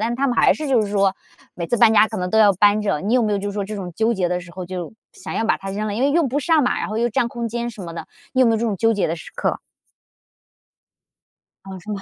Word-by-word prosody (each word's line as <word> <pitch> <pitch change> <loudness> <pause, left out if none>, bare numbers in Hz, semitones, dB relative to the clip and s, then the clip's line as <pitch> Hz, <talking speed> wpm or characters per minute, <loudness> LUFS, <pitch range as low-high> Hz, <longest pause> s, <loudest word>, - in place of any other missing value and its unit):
但 230 +2 -1
他 275 +2 0
们 245 - -1
还 - - +5
是 305 -2 -5
就 250 -4 +3
是 210 - -1
说 200 -1 +1 0.4
每 170 -1 -4
次 240 - 0
搬 225 -1 +5
家 220 - +6
可 220 - -6
能 180 0 -3
都 220 - +2
要 205 -2 +6
搬 205 +3 +3
着， 200 -8 -1
你 205 +5 -2
有 255 - +4
没 210 - 0
有 200 - +1
就 205 +1 -3
是 200 - -9
说 205 - -2
这 215 +2 -6
种 180 -4 -6
纠 225 +1 +1
结 180 -4 0
的 180 0 -1
时 175 -1 -13
候， 185 - -6
就 180 -1 -6 0.2
想 - - -8
要 225 - -1
把 225 - +2
它 195 - -7
扔 210 +2 -3
了？ 205 - -3
因 250 - -1
为 280 - +3
用 320 -3 +2
不 275 - -1
上 315 +1 +3
嘛， 250 - 0
然 - - -3
后 215 +1 -3
又 240 - +1
占 235 +1 0
空 235 0 -4
间 235 +1 -3
什 215 -3 -12
么 170 -2 -7
的。 170 - -7 0.3
你 260 - +2
有 - - +4
没 - - +4
有 - - +2
这 230 - -1
种 210 - -1
纠 225 +3 +2
结 205 - 0
的 165 - -2
时 165 - -11
刻？ - - -1 2.1
啊， 190 - -7
是 215 - -10
吗？ 200 - -4
215 Hz, 340 characters per minute, -21 LUFS, 195-235 Hz, 2.1 s, 家